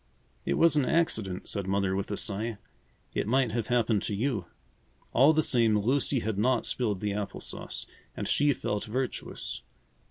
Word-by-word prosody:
"It - - +2
was 165 -2 +5
an 145 - +4
accident," 110 - 0
said 100 -3 -3
Mother 95 -1 +1
with 100 - -2
a 105 - -2
sigh. 110 +2 -1 0.6
"It - - -1
might 130 0 +2
have 115 -1 -2
happened 115 -4 +2
to 105 - -2
you." 110 -4 -1 0.7
All 135 +5 +7
the 155 0 +3
same, 115 -5 +3
Lucy 130 +4 +1
had 105 -1 -2
not 125 +2 +2
spilled 105 -7 0
the 105 -1 -1
apple 105 -1 -4
sauce, - - -5 0.3
and - - -2
she 145 0 +3
felt 105 -6 -2
virtuous. 125 - -3
110 Hz, 170 wpm, -29 LUFS, 100-130 Hz, 0.7 s, All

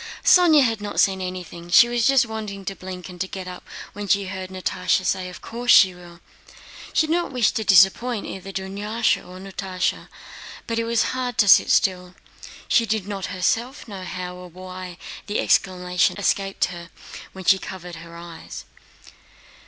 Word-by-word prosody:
Sónya 330 -5 +6
had 225 -4 0
not 205 - -4
seen 190 -1 +3
anything, 180 -2 -7
she 215 +6 +7
was 240 -1 +1
just 270 -3 +4
wanting 210 -3 -6
to 195 - -4
blink 185 -1 -8
and 180 -2 -9
to 190 - -1
get 190 -1 -7
up 180 0 -8 0.3
when 205 0 -6
she 200 0 +2
heard 185 -1 -6
Natásha 185 0 -1
say, 185 -1 -1
"Of 180 - -12
course 240 +1 -6
she 190 -6 +7
will!" 175 -1 -15 0.7
She 315 - +2
did 315 - -1
not 345 -3 -1
wish 250 -4 +2
to 225 - -2
disappoint 200 +4 +4
either 195 +1 -7
Dunyásha 205 +4 -1
or 180 +1 -12
Natásha, 190 -1 -3 0.6
but 230 0 -2
it 230 - -1
was 230 0 +2
hard 250 -2 -3
to 205 - +4
sit - - +7
still. 180 -2 +1 0.5
She 230 - +3
did 215 -3 -1
not 200 -2 -4
herself 225 - -2
know 195 -3 -8
how 180 -1 -6
or 180 0 -10
why 185 0 -9 0.3
the 205 - -1
exclamation 180 -1 +1
escaped 195 -1 0
her 170 -1 -9 0.4
when 190 - -9
she 190 +2 +5
covered 180 -3 -8
her 170 +1 -11
eyes. 170 -1 -10
190 Hz, 175 wpm, -23 LUFS, 180-220 Hz, 0.7 s, she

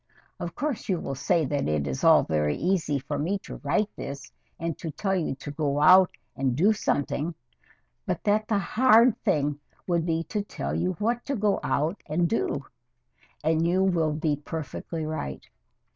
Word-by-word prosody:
Of 170 -1 -5
course 285 -8 -3
you 180 -3 +1
will 135 - -4
say 160 +4 +1
that 140 +1 -1
it 75 -2 0
is 65 -2 -4
all - - +7
very 75 -1 0
easy 170 -6 +1
for 145 +2 -4
me 180 +7 0
to - - -8
write 210 0 -1
this, 140 0 -7 0.3
and 165 -1 -2
to 165 - -4
tell 190 +5 -1
you 165 -7 -1
to 145 +2 -7
go 145 -1 -1
out 185 +4 +7 0.3
and 130 -2 0
do 195 - +4
something, 160 -4 -1 0.7
but - - -2
that 215 +1 +2
the 215 - +2
hard 230 +2 +5
thing 145 -1 +1 0.3
would 170 -2 +1
be 165 0 0
to 210 +4 -2
tell 200 - -5
you 185 +1 0
what 230 +7 -1
to 280 - -1
go 205 -3 +1
out 160 +7 -1
and 165 +3 +1
do 145 -9 -1 0.8
and 160 +1 +2
you 185 +2 +2
will 165 -5 +2
be 155 -1 0
perfectly 160 +2 -5
right. 155 - -5
165 Hz, 180 wpm, -26 LUFS, 145-195 Hz, 0.8 s, all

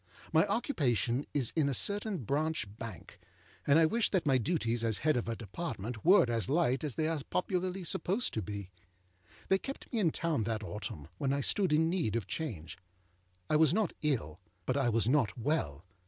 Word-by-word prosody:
My - - +5
occupation 135 - 0
is 135 -6 0
in 150 -4 +2
a 135 - 0
certain 205 - 0
Branch 155 +6 0
Bank, 115 -1 -8 0.5
and 140 - +6
I 165 - +6
wish 230 +8 +2
that 185 -4 0
my 135 -3 +4
duties 120 -5 0
as 110 -3 +2
head 155 -1 +4
of 120 - -1
a 115 - -2
Department 115 - -5
were 185 -2 +7
as 115 -5 -1
light 140 -3 +2
as 145 -5 -2
they 155 - 0
are 160 -2 -1
popularly 185 +1 -1
supposed 190 +7 0
to 110 - -1
be. 100 -1 -6 0.8
They 190 - +4
kept 275 +2 -8
me 230 - +1
in 180 -6 +3
town 155 -8 -1
that 110 -1 -2
autumn, 100 -8 -6
when 140 -3 0
I 140 0 0
stood 190 +5 +2
in 160 +2 +4
need 165 - 0
of 115 -5 -1
change. 95 - -5 0.7
I 155 - +3
was 160 +1 +4
not 215 -5 +1
ill, 110 - -1 0.3
but 130 - 0
I 135 -4 +2
was 115 -1 +1
not 130 -3 +2
well. 105 - -1
140 Hz, 195 wpm, -32 LUFS, 115-165 Hz, 0.8 s, were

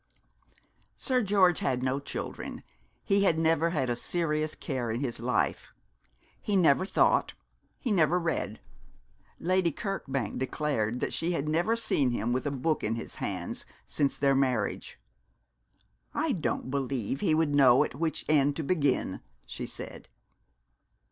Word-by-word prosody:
Sir 255 -1 +1
George 190 -4 +4
had 125 -2 0
no 130 +1 0
children; 140 - -6 0.4
he 200 0 +2
had 170 -5 +3
never 165 0 +2
had 150 -6 0
a 120 - 0
serious 155 +2 -1
care 130 -5 -3
in 115 +2 -1
his 125 -5 -3
life. 125 +2 -1 0.7
He 205 - -1
never 180 0 +4
thought, - - +2 0.4
he 245 - -3
never 170 -3 +3
read. 170 -2 -2 0.8
Lady 185 0 +2
Kirkbank 135 - -3
declared 125 -4 -1
that - - -1
she 170 +2 -1
had 150 -3 -2
never 170 +9 +2
seen 185 - +1
him 120 0 -1
with 130 +3 -1
a - - +2
book 145 +3 -1
in 110 +2 0
his 115 - -7
hands - - -4 0.2
since 140 -2 0
their 140 0 +3
marriage. 130 -6 -1 1.2
'I 310 +1 +1
don't 160 - -2
believe 135 -2 -2
he 155 - +2
would 155 -2 +1
know 130 -3 +6
at - - -4
which 160 +4 -2
end 145 -2 +3
to 160 - -3
begin,' 145 -4 0 0.2
she - - -6
said. - - -8
145 Hz, 150 wpm, -29 LUFS, 130-170 Hz, 1.2 s, know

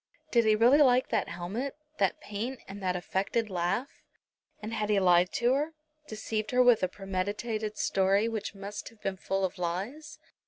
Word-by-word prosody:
Did 235 -2 +4
he 215 0 +5
really 240 +7 +5
like 255 -2 +4
that - - 0
helmet, 205 - -4 0.2
that - - +1
paint 235 +1 -5
and 200 +1 -8
that 185 -1 0
affected 195 +4 -1
laugh? 180 - -2 0.6
And 215 +1 -6
had 215 -1 -1
he 205 -2 +4
lied 180 -1 +4
to 245 +1 +2
her, 300 +4 -1 0.3
deceived 215 0 -3
her 250 0 +4
with 245 -3 +5
a 185 - +2
premeditated 205 +3 -3
story 195 +3 +2
which 220 -3 -4
must 200 +1 -7
have 230 - -22
been 195 -1 -2
full 195 +1 -1
of 180 - -5
lies? 235 - -4
210 Hz, 180 wpm, -29 LUFS, 190-235 Hz, 0.6 s, he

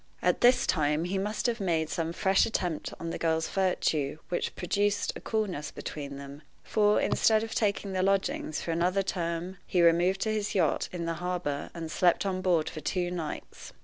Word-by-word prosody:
At - - +2
this 245 +1 +5
time 150 -1 +1
he 190 +2 -1
must 210 +2 -2
have 240 -1 +1
made 165 -5 +1
some 165 +1 -2
fresh 190 +4 +3
attempt 175 -8 -2
on 165 0 -4
the - - -4
girl's 160 -1 +1
virtue, 155 -6 0
which 175 - -2
produced: 205 +3 0
a - - -7
coolness 200 -9 -2
between 140 -2 -6
them; 140 +1 -9 0.2
for, 210 -1 +3
instead 220 -1 +3
of 225 0 -5
taking 200 -2 0
the 185 - +1
lodgings 190 -5 0
for 170 - -2
another 180 +4 +1
term, 175 0 -3
he 180 -2 +2
removed 175 +3 +4
to 220 - +1
his 210 -1 -2
yacht, 165 -6 +1
in 175 -2 -4
the 165 - -1
harbor, 175 -6 -2
and 165 -2 -5
slept 180 +3 +3
on 185 -1 -1
board 175 -4 +2
for 155 - -6
two 175 +3 -1
nights. 170 -3 -6
180 Hz, 190 wpm, -29 LUFS, 165-195 Hz, 0.2 s, this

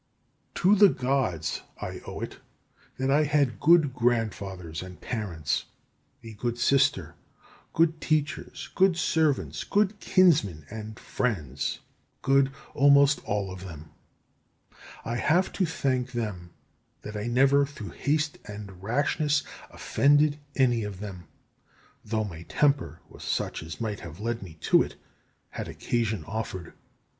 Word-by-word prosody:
17. - - -4 0.2
To 205 - +10
the - - +2
Gods 125 - 0 0.2
I - - -6
owe - - -6
it - - -6 0.6
that 130 +1 0
I 145 +2 +5
had 145 -4 +1
good 160 -4 +5
grandfathers 100 -9 -1
and 90 -1 -10
parents, 90 - -2 0.6
a 115 -1 -9
good 120 +3 -3
sister, 135 +3 +2 0.6
good 165 -1 +2
teachers, 155 0 -2
good 190 -2 +4
servants, 140 - +1
good 205 0 +1
kinsmen, 145 - +3
and 110 0 -7
friends, 75 - -2 0.4
good 135 0 +4 0.2
almost 140 0 +5
all 100 -2 -1
of 95 0 -8
them. 80 -4 -10 1.1
I 120 +1 -2
have 175 +9 +2
to 185 - +1
thank 130 -5 -1
them 105 -7 -4 0.5
that 105 - -7
I 105 +2 -3
never 135 +4 +4
through 140 -7 -6
haste 150 +1 -1
and 100 -3 -9
rashness 145 +6 +1 0.3
offended 145 +1 +3 0.2
any 120 -4 +3
of 100 -3 -6
them; 95 -4 -7 0.8
though 110 0 -1
my 85 -6 -7
temper 145 -2 +1
was - - -13
such - - -2
as 80 0 -8
might 110 -3 -3
have 85 +1 -10
led 115 +2 -2
me 90 -5 -9
to - - +5
it - - -3 0.5
had - - -6
occasion 115 -3 -2
offered. 100 -5 -5
120 Hz, 135 wpm, -27 LUFS, 100-145 Hz, 1.1 s, To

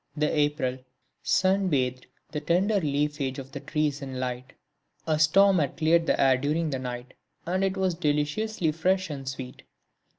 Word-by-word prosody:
The 150 0 +1
April 145 -4 0 0.4
sun 190 +1 +2
bathed 130 -5 -1 0.2
the 150 - -3
tender 190 +6 +2
leafage 145 -2 -1
of 135 -1 -8
the - - -6
trees 150 -2 -1
in 135 -2 -5
light. 125 0 -4 0.5
A 155 -1 +1
storm 190 +4 +5
had 145 -4 -1
cleared 165 +1 +3
the - - +2
air 135 -1 +5
during 150 +4 -1
the 135 - -2
night 125 0 -6 0.3
and 185 +3 0
it 195 0 0
was 190 -2 +1
deliciously 160 +4 0
fresh 185 +2 0
and 135 -2 -5
sweet. 130 -2 -7
150 Hz, 165 wpm, -27 LUFS, 135-175 Hz, 0.5 s, storm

